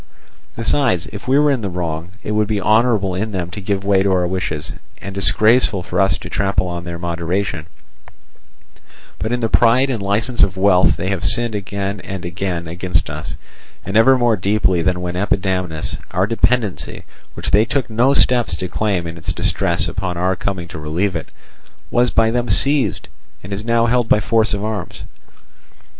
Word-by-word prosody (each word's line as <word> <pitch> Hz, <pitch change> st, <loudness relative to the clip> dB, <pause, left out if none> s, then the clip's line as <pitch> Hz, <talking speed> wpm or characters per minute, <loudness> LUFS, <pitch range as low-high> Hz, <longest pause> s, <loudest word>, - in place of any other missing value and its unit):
Besides, 115 Hz, -, +1 dB
if 105 Hz, -, -8 dB
we 135 Hz, +2 st, +4 dB
were 150 Hz, 0 st, +4 dB
in 130 Hz, -4 st, 0 dB
the 100 Hz, -, -3 dB
wrong, 85 Hz, 0 st, -4 dB
it -, -, -4 dB
would 105 Hz, 0 st, +1 dB
be 105 Hz, -1 st, -1 dB
honourable 105 Hz, -1 st, +2 dB
in 105 Hz, +4 st, -3 dB
them 90 Hz, -2 st, -3 dB
to 100 Hz, -, -6 dB
give 100 Hz, 0 st, -2 dB
way 100 Hz, -1 st, +3 dB
to 100 Hz, 0 st, +1 dB
our 90 Hz, -1 st, +2 dB
wishes, 90 Hz, -4 st, -3 dB, 0.3 s
and 100 Hz, -, -7 dB
disgraceful 105 Hz, +1 st, +3 dB
for 90 Hz, +1 st, -1 dB
us 95 Hz, -, +2 dB
to -, -, -9 dB
trample 95 Hz, -2 st, 0 dB
on 85 Hz, 0 st, -5 dB
their 85 Hz, -1 st, -5 dB
moderation; 85 Hz, 0 st, -3 dB, 1.5 s
but 110 Hz, -, -2 dB
in 120 Hz, 0 st, -1 dB
the 115 Hz, -, +1 dB
pride 120 Hz, +4 st, +4 dB
and 115 Hz, -5 st, -3 dB
licence 105 Hz, +5 st, +1 dB
of 95 Hz, 0 st, +3 dB
wealth 90 Hz, -6 st, +4 dB
they 95 Hz, -, -2 dB
have 95 Hz, -2 st, -2 dB
sinned 120 Hz, +2 st, +2 dB
again 100 Hz, 0 st, -3 dB
and 95 Hz, -2 st, -7 dB
again 85 Hz, -1 st, -3 dB
against 90 Hz, -1 st, -1 dB
us, 75 Hz, +1 st, -6 dB, 0.5 s
and 95 Hz, -, -5 dB
never 130 Hz, +5 st, +6 dB
more 120 Hz, -2 st, +3 dB
deeply 95 Hz, -2 st, +1 dB
than 90 Hz, +1 st, 0 dB
when 90 Hz, 0 st, -3 dB
Epidamnus, 95 Hz, -4 st, -1 dB
our 90 Hz, +2 st, +1 dB
dependency, 115 Hz, -2 st, 0 dB, 0.3 s
which -, -, -4 dB
they 105 Hz, -, +5 dB
took 130 Hz, +3 st, -1 dB
no 120 Hz, +5 st, +2 dB
steps 120 Hz, -10 st, +2 dB
to 90 Hz, +3 st, -4 dB
claim 95 Hz, -3 st, -1 dB
in 85 Hz, 0 st, -7 dB
its -, -, -3 dB
distress -, -, 0 dB
upon 90 Hz, -2 st, -3 dB
our 90 Hz, +2 st, +1 dB
coming 95 Hz, -3 st, -4 dB
to 80 Hz, -, -7 dB
relieve 85 Hz, +6 st, -1 dB
it, 80 Hz, -, -5 dB, 0.6 s
was 120 Hz, 0 st, +3 dB
by 115 Hz, -1 st, +2 dB
them 120 Hz, 0 st, -1 dB
seized, 140 Hz, -, +2 dB, 0.4 s
and 95 Hz, +2 st, -6 dB
is 100 Hz, +2 st, -4 dB
now 115 Hz, 0 st, +2 dB
held 120 Hz, -1 st, +1 dB
by -, -, +5 dB
force 110 Hz, +1 st, +1 dB
of 100 Hz, -, -5 dB
arms. 110 Hz, -1 st, -5 dB
100 Hz, 185 wpm, -19 LUFS, 90-115 Hz, 1.5 s, never